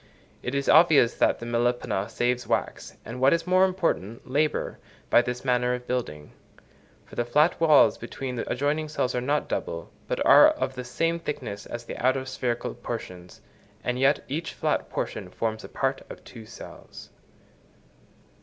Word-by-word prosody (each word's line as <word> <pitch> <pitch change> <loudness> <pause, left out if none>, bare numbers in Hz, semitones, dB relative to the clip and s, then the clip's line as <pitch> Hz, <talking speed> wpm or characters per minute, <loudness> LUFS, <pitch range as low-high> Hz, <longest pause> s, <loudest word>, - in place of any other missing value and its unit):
It 125 - -4
is 140 0 -1
obvious 155 -7 +6
that - - +3
the 115 - -8
Melipona 120 -4 -1
saves 125 0 -1
wax, - - -2
and 125 +2 -7
what 135 +3 +5
is 165 0 0
more 185 +1 +4
important, 165 - -2
labour, 150 +4 -1 0.3
by - - +7
this 125 +1 -5
manner 125 -1 +2
of 125 0 -9
building; 75 -14 -4 0.7
for - - -21
the 120 - 0
flat 150 +9 +2
walls 155 -3 +5
between 130 -2 -6
the 115 - -4
adjoining 150 +2 -1
cells 130 -4 -1
are 125 - -1
not 145 +4 0
double, - - -4 0.2
but - - -2
are 295 - +9
of 305 - -2
the 130 -1 -6
same 165 +6 -1
thickness 130 -10 -5
as 120 0 -7
the - - -7
outer 130 +1 +2
spherical 125 -2 -3
portions, 90 -6 -8 0.4
and 125 0 -2
yet 140 +2 +3
each 160 +5 -4
flat - - -1
portion - - -4
forms 110 -1 -3
a - - -9
part 135 0 -1
of - - -10
two 115 -3 -12
cells. - - -12
125 Hz, 170 wpm, -26 LUFS, 120-150 Hz, 0.7 s, are